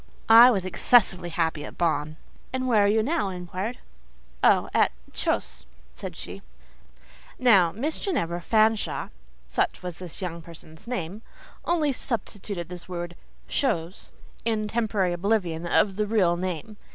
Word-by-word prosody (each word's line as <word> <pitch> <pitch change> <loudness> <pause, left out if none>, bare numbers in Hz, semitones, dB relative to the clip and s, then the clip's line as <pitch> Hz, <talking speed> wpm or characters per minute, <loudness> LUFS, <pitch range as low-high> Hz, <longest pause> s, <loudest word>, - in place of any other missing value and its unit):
I 230 +2 +10
was 195 -7 0
excessively 185 -2 +3
happy 160 -3 -1
at - - -9
Bonn!" 155 -2 0 0.3
"And 255 0 -2
where 215 -5 +4
are - - +4
you 215 +2 +3
now?" 305 -5 0
I 185 - -5
inquired. 185 +6 -4 0.7
"Oh! - - +5
at—chose," - - -1 0.3
said - - -7
she. - - -8 1.0
Now, 200 -9 +5
Miss 280 - -3
Ginevra 175 - -1
Fanshawe 220 +2 +1 0.4
(such 60 - -1
was 180 -2 -6
this 180 -3 -8
young 170 -3 -4
person's 165 +3 -13
name) 210 -4 -4 0.4
only 320 -4 +2
substituted 205 - -4
this 180 0 -9
word 175 -1 -5 0.3
"chose" 165 +3 -1 0.3
in 220 -2 0
temporary 210 -5 0
oblivion 175 -3 0
of 195 +2 +2
the 210 0 0
real 195 -6 +3
name. 185 +3 -4
190 Hz, 140 wpm, -26 LUFS, 170-225 Hz, 1.0 s, I